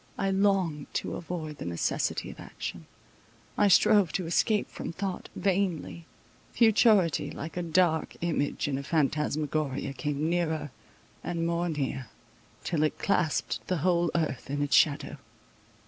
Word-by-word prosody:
I 195 Hz, 0 st, 0 dB
longed 190 Hz, -6 st, +1 dB
to -, -, -2 dB
avoid 160 Hz, -4 st, -5 dB
the -, -, -5 dB
necessity 85 Hz, -1 st, -1 dB
of -, -, -14 dB
action; -, -, -7 dB, 0.7 s
I 205 Hz, -, +4 dB
strove 200 Hz, -2 st, +5 dB
to 185 Hz, -, -1 dB
escape 210 Hz, +5 st, +1 dB
from -, -, -5 dB
thought—vainly—futurity, 195 Hz, -, 0 dB
like 160 Hz, +3 st, -7 dB
a 180 Hz, -, -1 dB
dark 170 Hz, -1 st, +1 dB
image 160 Hz, -5 st, -1 dB
in 135 Hz, -2 st, -1 dB
a -, -, -6 dB
phantasmagoria, 150 Hz, -2 st, -1 dB
came 145 Hz, +2 st, -2 dB
nearer 160 Hz, -4 st, -1 dB, 0.5 s
and 170 Hz, -1 st, -2 dB
more 170 Hz, +1 st, 0 dB
near, 135 Hz, -4 st, -3 dB, 0.6 s
till 165 Hz, -4 st, -1 dB
it 155 Hz, -, +1 dB
clasped 175 Hz, -6 st, 0 dB
the 185 Hz, -, 0 dB
whole 175 Hz, -2 st, +3 dB
earth 155 Hz, -5 st, -1 dB
in 145 Hz, +1 st, -1 dB
its 145 Hz, -, +2 dB
shadow. 145 Hz, -3 st, +3 dB
165 Hz, 130 wpm, -28 LUFS, 150-180 Hz, 0.7 s, strove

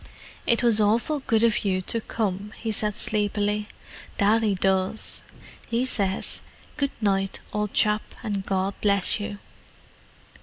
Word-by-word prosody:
"It 235 Hz, +1 st, +3 dB
was 225 Hz, -3 st, +4 dB
awful 230 Hz, +8 st, +2 dB
good 225 Hz, 0 st, +3 dB
of 230 Hz, -2 st, +3 dB
you 190 Hz, -2 st, +1 dB
to 230 Hz, +4 st, +1 dB
come," 210 Hz, -1 st, -3 dB
he 225 Hz, -, -2 dB
said 210 Hz, -1 st, 0 dB
sleepily. 210 Hz, -1 st, 0 dB, 0.5 s
"Daddy 210 Hz, 0 st, +3 dB
does. 190 Hz, +2 st, 0 dB, 0.5 s
He 235 Hz, +2 st, 0 dB
says, 200 Hz, -6 st, -1 dB, 0.3 s
'Good 280 Hz, -2 st, 0 dB
night, 195 Hz, -2 st, +1 dB
old 210 Hz, -1 st, -2 dB
chap, 210 Hz, -1 st, +3 dB, 0.2 s
and 200 Hz, -3 st, -2 dB
God 190 Hz, 0 st, -1 dB
bless 200 Hz, 0 st, +3 dB
you. 205 Hz, 0 st, -4 dB
210 Hz, 130 wpm, -25 LUFS, 195-225 Hz, 0.5 s, was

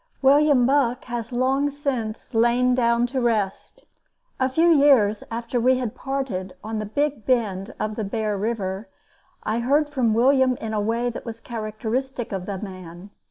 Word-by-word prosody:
William 280 Hz, -2 st, +5 dB
Buck 260 Hz, -2 st, +1 dB
has 240 Hz, -2 st, -5 dB
long 265 Hz, +3 st, +1 dB
since 260 Hz, -7 st, -4 dB
lain 240 Hz, +2 st, +3 dB
down 235 Hz, -1 st, +2 dB
to 260 Hz, +1 st, -2 dB
rest. 215 Hz, -5 st, -2 dB, 0.5 s
A 260 Hz, 0 st, +2 dB
few 320 Hz, +6 st, +3 dB
years 275 Hz, -10 st, +4 dB
after 235 Hz, +1 st, -2 dB
we 255 Hz, +2 st, +4 dB
had 245 Hz, -4 st, -3 dB
parted 260 Hz, -9 st, -4 dB
on 220 Hz, 0 st, -3 dB
the 215 Hz, -, -4 dB
big 285 Hz, +1 st, -1 dB
bend 210 Hz, -6 st, 0 dB
of 215 Hz, 0 st, -2 dB
the 220 Hz, -, -3 dB
Bear 210 Hz, +1 st, -2 dB
River, 200 Hz, -1 st, -3 dB, 0.5 s
I 220 Hz, +2 st, -1 dB
heard 290 Hz, +5 st, +2 dB
from 250 Hz, -7 st, +1 dB
William 260 Hz, +1 st, +4 dB
in 220 Hz, -1 st, -5 dB
a 210 Hz, -, 0 dB
way 230 Hz, +3 st, 0 dB
that -, -, -7 dB
was 230 Hz, -2 st, -7 dB
characteristic 230 Hz, +3 st, -4 dB
of 190 Hz, -2 st, -4 dB
the 200 Hz, -2 st, -3 dB
man. 185 Hz, -1 st, -9 dB
235 Hz, 165 wpm, -23 LUFS, 215-260 Hz, 0.5 s, William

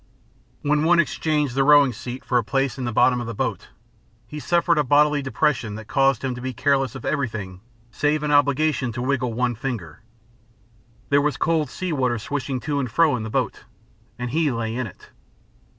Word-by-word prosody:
When 150 Hz, +1 st, +2 dB
one 170 Hz, +1 st, +4 dB
exchanged 150 Hz, -3 st, 0 dB
the 135 Hz, +1 st, +2 dB
rowing 145 Hz, -2 st, +6 dB
seat 120 Hz, +3 st, -7 dB
for 125 Hz, -, +2 dB
a -, -, -2 dB
place 135 Hz, +2 st, -1 dB
in 130 Hz, -, -3 dB
the 120 Hz, -, -2 dB
bottom 125 Hz, +2 st, +3 dB
of 120 Hz, -, -5 dB
the 115 Hz, -, -5 dB
boat, -, -, -3 dB, 0.6 s
he 150 Hz, -, -8 dB
suffered 170 Hz, +1 st, +2 dB
a -, -, +3 dB
bodily 145 Hz, +2 st, +3 dB
depression 130 Hz, -4 st, -1 dB
that 110 Hz, 0 st, -9 dB
caused 135 Hz, -3 st, +2 dB
him 130 Hz, -1 st, -1 dB
to 125 Hz, -, -8 dB
be 130 Hz, 0 st, -4 dB
careless 135 Hz, +1 st, +1 dB
of 130 Hz, -, -8 dB
everything 110 Hz, -10 st, -3 dB, 0.3 s
save 150 Hz, +3 st, 0 dB
an 150 Hz, -, -1 dB
obligation 145 Hz, -2 st, +2 dB
to 120 Hz, -, -4 dB
wiggle 130 Hz, -3 st, -1 dB
one 125 Hz, +1 st, 0 dB
finger. 115 Hz, -, -6 dB, 1.1 s
There 145 Hz, 0 st, +4 dB
was 150 Hz, 0 st, 0 dB
cold 160 Hz, -4 st, +1 dB
sea 180 Hz, +4 st, -4 dB
water 125 Hz, -4 st, 0 dB
swashing 130 Hz, +2 st, -3 dB
to 145 Hz, 0 st, -2 dB
and 130 Hz, -3 st, -2 dB
fro 155 Hz, +4 st, +3 dB
in 120 Hz, -, -3 dB
the 110 Hz, -, -5 dB
boat, -, -, -2 dB, 0.5 s
and 125 Hz, -1 st, -4 dB
he 155 Hz, +1 st, +1 dB
lay 115 Hz, -2 st, -3 dB
in 130 Hz, -1 st, -2 dB
it. 95 Hz, -, -15 dB
135 Hz, 200 wpm, -23 LUFS, 120-150 Hz, 1.1 s, rowing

